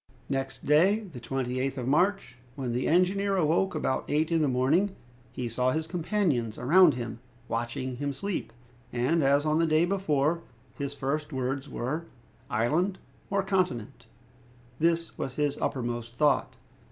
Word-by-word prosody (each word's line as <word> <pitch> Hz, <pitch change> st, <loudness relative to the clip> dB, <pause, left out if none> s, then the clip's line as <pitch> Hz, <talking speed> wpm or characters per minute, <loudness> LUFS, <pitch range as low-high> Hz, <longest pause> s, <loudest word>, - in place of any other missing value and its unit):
Next 135 Hz, -1 st, -3 dB
day, 185 Hz, +9 st, +4 dB
the 175 Hz, -, -9 dB
28th 130 Hz, +2 st, -2 dB
of 125 Hz, -1 st, -3 dB
March, 175 Hz, -2 st, +2 dB, 0.2 s
when 130 Hz, -4 st, -3 dB
the 125 Hz, +2 st, -1 dB
engineer 195 Hz, +3 st, +2 dB
awoke, 175 Hz, +3 st, +2 dB
about 130 Hz, -, 0 dB
eight 155 Hz, +3 st, +1 dB
in 165 Hz, -1 st, +3 dB
the 150 Hz, -, +3 dB
morning, 145 Hz, +10 st, +2 dB, 0.4 s
he 125 Hz, -1 st, -4 dB
saw 125 Hz, +2 st, +1 dB
his 155 Hz, +4 st, -1 dB
companions 165 Hz, -, 0 dB
around 165 Hz, +4 st, +6 dB
him 115 Hz, -2 st, -5 dB, 0.3 s
watching 120 Hz, +2 st, -3 dB
his 140 Hz, 0 st, -3 dB
sleep, 200 Hz, -, -3 dB, 0.4 s
and, 130 Hz, +7 st, +1 dB
as 140 Hz, +1 st, +3 dB
on 155 Hz, +1 st, +2 dB
the 165 Hz, -, +3 dB
day 155 Hz, +2 st, +4 dB
before, 170 Hz, -4 st, +1 dB, 0.3 s
his 140 Hz, 0 st, -4 dB
first 145 Hz, +3 st, -2 dB
words 135 Hz, +1 st, -2 dB
were: 155 Hz, +7 st, -3 dB, 0.4 s
"Island 155 Hz, -, +1 dB, 0.3 s
or 200 Hz, 0 st, +1 dB
continent?" 185 Hz, -, -1 dB, 0.7 s
This 165 Hz, +1 st, +1 dB
was 130 Hz, -, -3 dB
his 145 Hz, -1 st, 0 dB
uppermost 120 Hz, -2 st, -3 dB
thought. 145 Hz, +1 st, +2 dB
145 Hz, 150 wpm, -28 LUFS, 130-170 Hz, 0.7 s, around